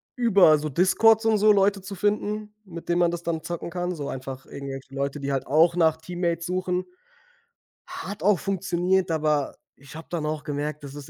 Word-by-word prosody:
über 200 Hz, -10 st, +5 dB
so 150 Hz, +1 st, -4 dB
Discords 220 Hz, -, +4 dB
und 220 Hz, -1 st, +3 dB
so 210 Hz, +1 st, +5 dB
Leute 200 Hz, -1 st, +3 dB
zu 195 Hz, +1 st, -8 dB
finden, 210 Hz, +1 st, -1 dB
mit 170 Hz, -2 st, -10 dB
denen 175 Hz, -, +2 dB
man 175 Hz, -1 st, +3 dB
das 175 Hz, 0 st, -5 dB
dann 165 Hz, -2 st, -2 dB
zocken 170 Hz, 0 st, -5 dB
kann. 180 Hz, +1 st, -3 dB
So 145 Hz, -2 st, -5 dB
einfach 130 Hz, 0 st, -7 dB
irgendwelche 135 Hz, -1 st, -8 dB
Leute, 140 Hz, +1 st, -3 dB
die 140 Hz, 0 st, -3 dB
halt 135 Hz, -1 st, -2 dB
auch 165 Hz, +4 st, +4 dB
nach 160 Hz, -2 st, +3 dB
Teammates 170 Hz, 0 st, -3 dB
suchen. 180 Hz, 0 st, -2 dB, 1.0 s
Hat 200 Hz, 0 st, -7 dB
auch 205 Hz, -2 st, +4 dB
funktioniert, 190 Hz, -1 st, 0 dB
aber 150 Hz, -3 st, 0 dB, 0.2 s
ich 140 Hz, +1 st, -15 dB
habe 160 Hz, -, -9 dB
dann 165 Hz, -3 st, -3 dB
auch 155 Hz, 0 st, -3 dB
gemerkt, 150 Hz, +1 st, -4 dB
das 140 Hz, 0 st, -9 dB
ist 145 Hz, 0 st, -9 dB
170 Hz, 195 wpm, -25 LUFS, 150-190 Hz, 1.0 s, über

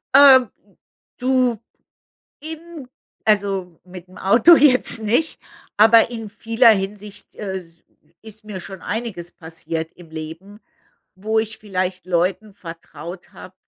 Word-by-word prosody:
Äh, 270 Hz, -3 st, +8 dB, 0.7 s
du, 255 Hz, -2 st, +1 dB, 0.8 s
eben 320 Hz, -2 st, -9 dB, 0.4 s
also, 195 Hz, -5 st, 0 dB
mit 180 Hz, 0 st, -12 dB
dem 185 Hz, -, -16 dB
Auto 230 Hz, -, +6 dB
jetzt 255 Hz, -5 st, +4 dB
nicht, 245 Hz, +10 st, 0 dB, 0.4 s
aber 225 Hz, +2 st, +6 dB
in 225 Hz, -2 st, -6 dB
vieler 225 Hz, +2 st, +3 dB
Hinsicht, 205 Hz, 0 st, -5 dB
äh, 195 Hz, -3 st, -5 dB
s 165 Hz, -2 st, -13 dB, 0.4 s
ist 220 Hz, 0 st, -14 dB
mir 200 Hz, -3 st, -7 dB
schon 190 Hz, 0 st, -10 dB
einiges 210 Hz, -7 st, -5 dB
passiert 160 Hz, 0 st, -7 dB
im 170 Hz, -3 st, -16 dB
Leben, 165 Hz, +6 st, -9 dB, 0.6 s
wo 215 Hz, +3 st, -1 dB
ich 220 Hz, 0 st, -3 dB
vielleicht 185 Hz, -3 st, -4 dB
Leuten 185 Hz, +4 st, -1 dB
vertraut 170 Hz, +1 st, -11 dB
habe, 185 Hz, -, -13 dB
205 Hz, 125 wpm, -20 LUFS, 180-230 Hz, 0.8 s, Äh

